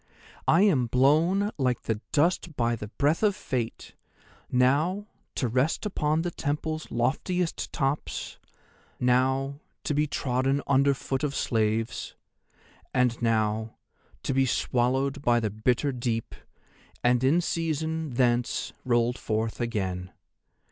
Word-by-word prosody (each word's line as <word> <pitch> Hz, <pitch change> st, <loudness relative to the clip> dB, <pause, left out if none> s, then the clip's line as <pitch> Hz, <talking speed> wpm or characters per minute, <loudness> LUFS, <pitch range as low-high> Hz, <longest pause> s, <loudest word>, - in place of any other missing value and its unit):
I 170 Hz, +5 st, +5 dB
am 145 Hz, -, +3 dB
blown 160 Hz, -, +3 dB
like 125 Hz, -3 st, 0 dB
the 110 Hz, -1 st, -2 dB
dust 165 Hz, +1 st, +1 dB
by 120 Hz, -2 st, +1 dB
the 105 Hz, -2 st, -7 dB
breath 145 Hz, +8 st, +1 dB
of 210 Hz, -3 st, +3 dB
Fate; 120 Hz, -3 st, -4 dB, 0.6 s
now 150 Hz, +11 st, +2 dB, 0.3 s
to 125 Hz, -, 0 dB
rest 130 Hz, -, 0 dB
upon 155 Hz, -5 st, 0 dB
the 175 Hz, -, -2 dB
Temple's 155 Hz, +1 st, -3 dB
loftiest 160 Hz, +8 st, -1 dB
tops, 135 Hz, +2 st, -2 dB, 0.6 s
now 130 Hz, +3 st, +1 dB, 0.2 s
to -, -, -1 dB
be 150 Hz, +1 st, +2 dB
trodden 135 Hz, 0 st, 0 dB
underfoot 135 Hz, 0 st, +1 dB
of 140 Hz, -2 st, -1 dB
slaves, 110 Hz, 0 st, -1 dB, 0.8 s
and 125 Hz, -2 st, +2 dB
now 110 Hz, -1 st, 0 dB, 0.5 s
to -, -, -1 dB
be 135 Hz, 0 st, +3 dB
swallowed 130 Hz, +4 st, 0 dB
by 120 Hz, -3 st, +3 dB
the 110 Hz, -3 st, -1 dB
bitter 120 Hz, +6 st, +1 dB
deep, 120 Hz, -3 st, -2 dB, 0.7 s
and 120 Hz, 0 st, +3 dB
in 145 Hz, +6 st, +4 dB
season 160 Hz, -3 st, -2 dB
thence 120 Hz, -1 st, +1 dB
rolled 120 Hz, 0 st, +1 dB
forth 110 Hz, +2 st, -2 dB
again. 95 Hz, -6 st, -2 dB
130 Hz, 120 wpm, -27 LUFS, 120-150 Hz, 0.8 s, I